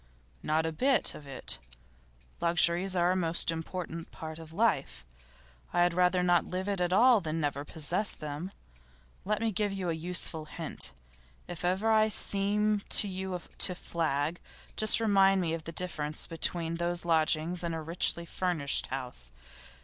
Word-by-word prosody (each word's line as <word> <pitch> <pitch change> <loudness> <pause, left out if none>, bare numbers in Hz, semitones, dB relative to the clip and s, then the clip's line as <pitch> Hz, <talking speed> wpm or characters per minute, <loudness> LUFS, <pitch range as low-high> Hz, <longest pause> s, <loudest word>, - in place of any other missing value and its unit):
'Not 155 +1 0
a 160 - -1
bit 260 - +2
of 145 - -11
it. 135 -1 -3 0.8
Luxuries 175 +2 +3
are 175 0 +3
a - - +1
most 170 -2 +1
important 165 0 -5
part 160 0 -8
of 160 -1 -11
life. 190 -6 0 0.7
I 175 - +3
had 175 0 +3
rather 180 0 +2
not 175 -1 +3
live 185 +2 -4
at 180 -3 0
all 235 +3 +5
than 160 -1 -3
never 145 -2 -2
possess 170 +7 -1
them. 150 +5 -6 0.7
Let 210 +1 0
me 225 0 0
give 205 +1 -1
you 190 -3 -2
a 160 -1 -5
useful 170 -2 0
hint; - - -5 0.6
if 175 0 -6
ever 190 +5 +1
I 215 0 +5
seem 210 0 +1
to 205 - +7
you 190 -1 -4 0.2
to 180 - +4
flag, 160 -1 -2 0.3
just 215 +1 +5
remind 195 -3 +4
me 165 -3 -1
of 165 -1 -5
the 165 - -5
difference 155 -3 -2
between 165 0 -2
these 175 0 -1
lodgings 165 +1 +1
and 170 -1 -2
a - - -3
richly 170 +1 +1
furnished 170 -6 -1
house. 125 - -4
175 Hz, 160 wpm, -30 LUFS, 160-190 Hz, 0.8 s, to